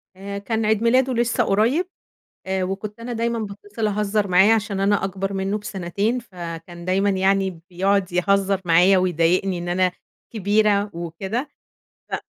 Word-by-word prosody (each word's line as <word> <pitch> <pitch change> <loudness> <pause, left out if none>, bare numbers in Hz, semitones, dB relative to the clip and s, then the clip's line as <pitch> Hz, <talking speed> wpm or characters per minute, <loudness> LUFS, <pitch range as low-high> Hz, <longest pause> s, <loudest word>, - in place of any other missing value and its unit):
آآ، 200 +1 -6
كان 220 +2 -2
عيد 215 +1 +1
ميلاده 255 +2 +3
لسه 240 +1 +1
قريّب، 230 - +2 0.6
وكنت 195 +3 -3
أنا 240 +1 -5
دايمًا 235 0 -1
باتصل 205 +1 -4
أهزر 210 0 0
معاه 190 +4 +5
عشان 210 -3 -2
أنا 200 0 +2
أكبر 195 +1 -3
منه 195 +2 -1
بسنتين، 205 +3 -2
فكان 175 -5 -8
دايمًا 195 +3 +2
يعني 190 -2 +1
بيقعد 190 +1 +1
يهزر 195 +2 +2
معايا 180 +3 +5
ويضايقني 180 +1 +1
إن 175 0 -5
أنا 180 +1 +1 0.4
كبيرة 205 -1 +2
وكده، 190 - -4 0.6
ف - - -2
200 Hz, 140 wpm, -22 LUFS, 185-215 Hz, 0.6 s, معاه